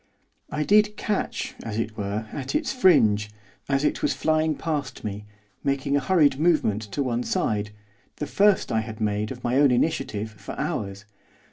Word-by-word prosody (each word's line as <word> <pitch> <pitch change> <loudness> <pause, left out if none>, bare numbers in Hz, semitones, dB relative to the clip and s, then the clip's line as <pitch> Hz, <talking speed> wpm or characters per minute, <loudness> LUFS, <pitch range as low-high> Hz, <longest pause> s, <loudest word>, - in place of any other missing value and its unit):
I 150 0 -1
did 210 +4 +4
catch, 210 -2 -2
as 110 -2 -5
it 115 -1 -2
were, 105 +1 -3
at 140 - -4
its 300 -4 0
fringe, 110 - +4 0.4
as 135 0 +1
it - - 0
was - - +1
flying 155 0 +1
past 150 -5 -3
me, 105 0 -5 0.4
making 140 0 0
a - - +4
hurried 145 -3 +3
movement 155 -11 +2
to 140 - 0
one 120 -2 -1
side, 105 -3 -1 0.5
the 150 - -4
first 200 +6 +3
I 110 - +2
had 110 0 -8
made, 105 0 -1
of 125 -1 -8
my 120 +2 +1
own 145 0 +6
initiative, 120 -5 0
for 105 - -9
hours. 100 0 -3
130 Hz, 170 wpm, -25 LUFS, 110-155 Hz, 0.5 s, own